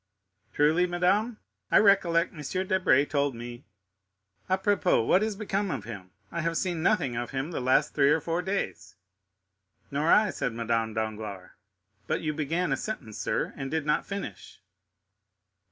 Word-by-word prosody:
"Truly, 160 +5 +3
madame, 195 +6 +1 0.3
I - - +5
recollect 185 -4 +4
M. 185 +5 -3
Debray 185 -8 +3
told 140 -3 0
me——apropos, 105 - -2
what 185 - +4
has 215 -1 -1
become 200 -1 -2
of 135 - -3
him? 100 -5 -8 0.2
I 170 - -2
have 165 0 -1
seen 175 -3 -1
nothing 160 - +1
of 120 +1 -3
him 135 +5 -3
the - - -3
last 130 +1 +2
three 140 -1 +4
or 155 - +4
four 165 +3 -2
days." 180 - -3 1.0
"Nor 145 +4 +1
I," 210 -2 +5
said 120 - -2
Madame 115 -1 -1
Danglars; 105 -4 -4 0.6
"but - - -1
you 155 -1 -1
began 160 +3 -1
a 135 - +1
sentence, 130 - -6
sir, - - -1
and 135 - -5
did 160 0 -1
not 150 0 +1
finish." 195 - -7
150 Hz, 155 wpm, -28 LUFS, 115-185 Hz, 1.0 s, I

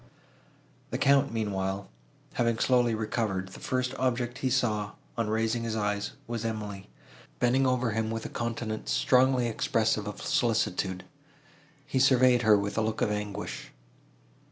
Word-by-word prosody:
The - - -2
Count, 140 -1 +4
meanwhile, 100 -3 -2 0.5
having 115 -1 +1
slowly 120 -1 +3
recovered, 105 -4 -2
the - - -11
first 130 0 -1
object 125 0 -1
he 130 - 0
saw, 110 -5 0 0.2
on 115 -2 -1
raising 110 +2 0
his 115 -1 -2
eyes, 105 -1 -1
was 115 -1 -4
Emily, 105 -3 -5 0.5
bending 130 +2 +3
over 125 -2 +1
him 110 0 -1
with 115 0 -4
a - - -4
countenance 115 -2 -4
strongly 130 -1 +3
expressive 110 -2 0
of 105 - -6
solicitude. 110 -9 0 0.8
He 135 - -1
surveyed 130 -2 +5
her 110 -2 +6
with 100 +1 -2
a - - +2
look 110 0 -1
of - - +1
anguish. 105 -1 -4
115 Hz, 145 wpm, -28 LUFS, 105-125 Hz, 0.8 s, her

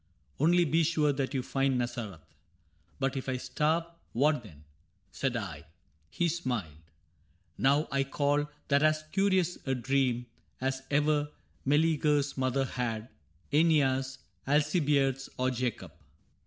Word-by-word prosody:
Only 175 +4 +4
be 160 +2 +2
sure 150 -2 +2
that 135 0 -2
you 130 - 0
find 135 0 +1
Nazareth.' 120 -8 -4 0.3
— 75 - -40
* 80 -2 -35
But 135 0 0
if 135 0 -3
I 130 - 0
starve 155 +5 0 0.2
— - - -39
what 150 +3 +2
then? 80 -10 -15 0.3
' 95 +1 -42
said 130 -3 -1
I. 85 -8 -6 0.2
— 75 +1 -39
He 175 - +4
smiled. 130 - -1
^ 80 - -17 0.8
Now 140 +3 +3
I 140 0 +2
call 145 +1 0 0.2
that 140 0 +4
as 155 0 +3
curious 190 -3 +2
a 135 - +1
dream 125 -1 0 0.3
As 130 0 -1
ever 150 0 +2 0.4
Mcleagcr's 150 -1 +2
mother 130 +1 +1
had, 115 -3 -3 0.2
— 80 - -30
^neas, 135 -4 +3 0.3
Alcibiades, 145 -2 +2
or 130 0 +1
Jacob. 125 -2 -3
135 Hz, 150 wpm, -30 LUFS, 125-150 Hz, 0.8 s, Only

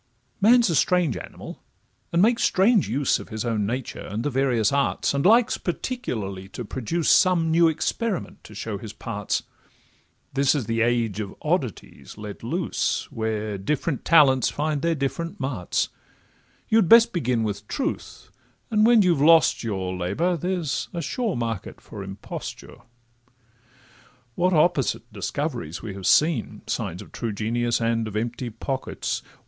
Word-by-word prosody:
Man 240 +4 +6
's 230 - +2
a - - +1
strange 175 -2 +2
animal, - - -9 0.5
and 170 +2 +3
makes 230 +2 +3
strange 200 - +3
use 135 +4 +1
Of - - -10
his 110 +1 -4
own 110 -4 0
nature, 125 +3 -4
and 105 +4 -4
the 145 - -1
various 125 -5 +2
arts, 140 0 +1
And 140 0 0
likes 230 +4 +4
particularly 110 - -4
to 120 - -4
produce 135 +9 -2
Some 170 -4 +4
new 165 +1 +5
experiment 185 +6 -2
to 105 - -12
show 105 -1 -4
his 110 -1 -8
parts; 105 -3 -3 0.9
This 140 +1 +3
is 135 -6 -1
the 115 +2 -1
age 115 -3 +1
of 100 -2 -5
oddities - - -3
let 105 -1 -8
loose, 165 +9 -2
Where 110 -2 -3
different 145 - -2
talents 135 -7 +5
find 145 +4 -2
their 170 +1 +1
different 160 +4 -3
marts; 130 -10 -1 0.8
You'd 220 -6 +3
best 230 0 +7
begin 125 -9 0
with 105 -1 -4
truth, 275 - -4 0.4
and 215 -1 +3
when 235 -3 +6
you've 170 -6 +2
lost 165 -2 +5
your 95 -4 -3
Labour, 100 - 0
there's 175 -3 -2
a 170 - -2
sure 225 - -2
market 115 -5 -4
for 105 - -10
imposture. 95 +1 -8 1.6
What 180 +8 +1
opposite 155 -5 +1
discoveries 120 - -4
we 105 -4 -5
have 95 -1 -4
seen! 150 - +2
(Signs 90 +5 -3
of - - -17
true 115 -3 -4
genius, 120 +3 0
and 115 -1 0
of 105 - -7
empty 120 +3 -3
pockets.) 130 +4 -4
130 Hz, 155 wpm, -24 LUFS, 110-170 Hz, 1.6 s, best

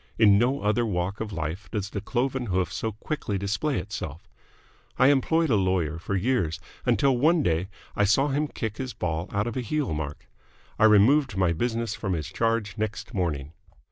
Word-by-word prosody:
In 100 -3 +6
no 130 +4 +1
other 105 +3 +2
walk 95 -2 -2
of 110 -1 -4
life 85 +1 -4
does 100 0 -3
the 100 - -3
cloven 130 +3 -1
hoof 95 -1 0
so 110 +4 -2
quickly 105 -2 -3
display 105 +9 -1
itself. 85 -6 -6 0.7
I 130 - +6
employed 160 +3 +2
a - - +5
lawyer 90 -5 0
for 95 +3 -3
years, 95 -7 0 0.3
until 125 +3 +3
one 155 +5 +3
day 85 -1 +1 0.3
I 105 - +3
saw 135 +8 +3
him 145 +2 0
kick 110 -6 -5
his 130 -2 -5
ball 85 +1 -2
out 100 +1 0
of 120 - -4
a 130 - -1
heel 140 - -1
mark. 75 -1 -5 0.5
I 110 - +6
removed 115 +4 +5
my 90 -3 +3
business 115 +4 -1
from 105 -4 -2
his 80 -3 -3
charge 110 +1 -1
next 110 +3 -3
morning. 80 - -2
105 Hz, 185 wpm, -26 LUFS, 90-125 Hz, 0.7 s, In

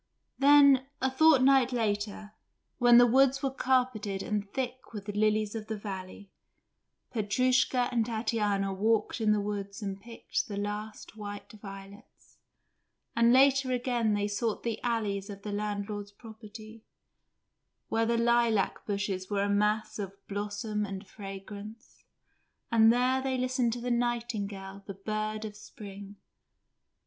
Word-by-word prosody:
Then 280 -2 +6
a 265 - 0
fortnight 270 -3 +5
later, 210 -2 -2 0.5
when 240 -1 +7
the 245 - +8
woods 270 +3 +3
were 270 - +1
carpeted 250 -7 0
and 205 -2 -3
thick 255 -1 -5
with 205 -1 -7
lilies 215 0 +1
of 220 -1 -6
the 220 - -3
valley, 195 -1 -8 0.8
Petrushka 250 +3 +2
and 235 -2 +2
Tatiana 210 -4 -1
walked 220 +4 0
in 215 -1 +3
the 210 - +3
woods 200 0 -4
and 195 -1 -5
picked 230 +1 -4
the 205 - -5
last 210 +2 -5
white 205 -1 -7
violets, 195 -1 -13 0.8
and 235 0 +5
later 270 0 +5
again 240 -3 +1
they 205 0 0
sought 210 +2 -2
the 230 -2 -3
alleys 210 -4 -1
of 200 -1 -9
the 210 - -4
landlord's 205 0 -4
property, 220 0 -12 1.1
where 225 0 +1
the 235 0 +1
lilac 235 -3 +2
bushes 195 -2 -2
were 200 -1 0
a 205 - 0
mass 210 +2 +1
of 195 -2 -4
blossom 205 +1 -3
and 195 0 -6
fragrance, 205 +3 -10 0.7
and 225 -1 +6
there 255 +2 +2
they 260 -1 -1
listened 255 -1 0
to 245 - -5
the 245 +1 -3
nightingale, 210 -5 -2
the 195 - -6
bird 215 +2 -3
of 210 -1 -7
spring. 200 -1 -10
215 Hz, 135 wpm, -29 LUFS, 205-240 Hz, 1.1 s, the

